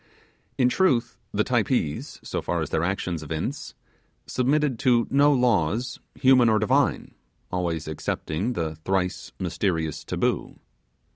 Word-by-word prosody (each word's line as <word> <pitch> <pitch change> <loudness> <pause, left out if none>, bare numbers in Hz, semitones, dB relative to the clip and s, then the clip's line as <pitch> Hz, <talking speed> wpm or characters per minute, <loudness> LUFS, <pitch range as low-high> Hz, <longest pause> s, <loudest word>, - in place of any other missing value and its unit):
In 125 - +4
truth, 125 -6 +1
the - - +1
Typees, 75 0 -1
so - - -3
far 85 -2 -1
as 75 - -7
their 80 - +1
actions 90 -3 -2
evince, 80 - -4 0.5
submitted 135 -1 +1
to 120 -2 +3
no 145 +1 +5
laws 120 - +1 0.2
human 130 -3 +5
or 110 - +4
divine 130 +7 +1 0.4
always 85 -4 -2
excepting 80 +7 -2
the 80 -5 -3
thrice 90 +2 -2
mysterious 85 -3 -1
Taboo. - - -1
100 Hz, 125 wpm, -25 LUFS, 80-125 Hz, 0.5 s, no